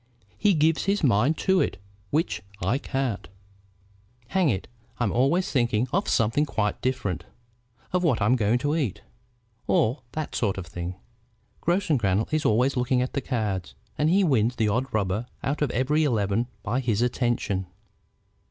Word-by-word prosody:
He 205 -3 +3
gives 160 +1 +2
his 200 -1 +1
mind 130 +5 +3
to 190 -1 +4
it, - - -1 0.3
which 160 - 0 0.2
I 110 +9 0
can't. 135 -7 -2 1.0
Hang 185 -5 +2
it! 95 -6 -1 0.3
I'm 120 -5 +1
always 140 +10 +2
thinking 120 -2 +1
of 195 +3 +1
something 115 +5 +2
quite 110 -8 -1
different, 105 - -2 0.7
of 180 0 +2
what 150 -9 +2
I'm 110 +4 +3
going 115 0 +2
to 145 +2 +2
eat, 135 - -2 0.6
or 125 +5 +2
that 155 -1 -4
sort 100 -5 0
of 95 - -5
thing. 85 +2 -5 0.7
Grossengrannel 135 - +1
is 155 -1 +1
always 125 +4 +3
looking 125 0 +2
at 130 - -5
the 140 - -1
cards, 105 -9 -2 0.2
and 150 +1 +2
he 195 +3 +4
wins 125 - +2
the 110 -2 +1
odd 125 +6 -1
rubber 105 +2 -1 0.2
out 145 +3 -1
of 150 - +2
every 140 +6 +1
eleven 110 -4 +1 0.2
by 120 +7 0
his 120 -3 +1
attention. 120 -6 0
125 Hz, 160 wpm, -26 LUFS, 105-150 Hz, 1.0 s, to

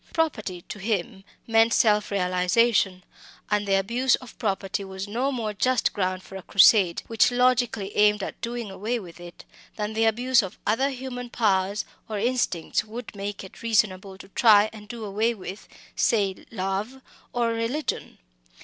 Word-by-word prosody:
Property 215 - -1
to 210 - -8
him 195 -2 -2 0.2
meant 225 0 +4
"self 210 -2 +3
realisation"; 185 +1 +2 0.5
and 210 0 +1
the 195 - +3
abuse 235 +6 +2
of 255 -3 -12
property 195 -2 -2
was 190 0 -6
no 245 +7 -1
more 225 -5 -3
just 255 +4 +1
ground 185 -2 -2
for 195 - -12
a - - -8
crusade 190 -1 +5
which 225 -1 +3
logically 245 -5 +1
aimed 210 -1 +4
at - - -7
doing 235 -3 -4
away 215 +5 -2
with 180 -6 -10
it, 175 0 -12 0.3
than 210 0 -3
the 225 +1 +2
abuse 240 +3 +3
of 190 -1 -7
other 260 +7 +2
human 250 -2 -6
powers 200 -3 +1 0.2
or 215 - -3
instincts 215 -7 0
would 225 +1 -9
make 200 0 -5
it 190 - -13
reasonable 195 -4 0
to 195 0 -13
try 215 0 +5
and 210 -1 -11
do 225 0 -7
away 220 +4 0
with 195 0 -9 0.3
say 200 -5 0
love, 200 +5 -3 0.3
or 240 -1 0
religion. 230 +6 -3
210 Hz, 160 wpm, -25 LUFS, 195-235 Hz, 0.5 s, crusade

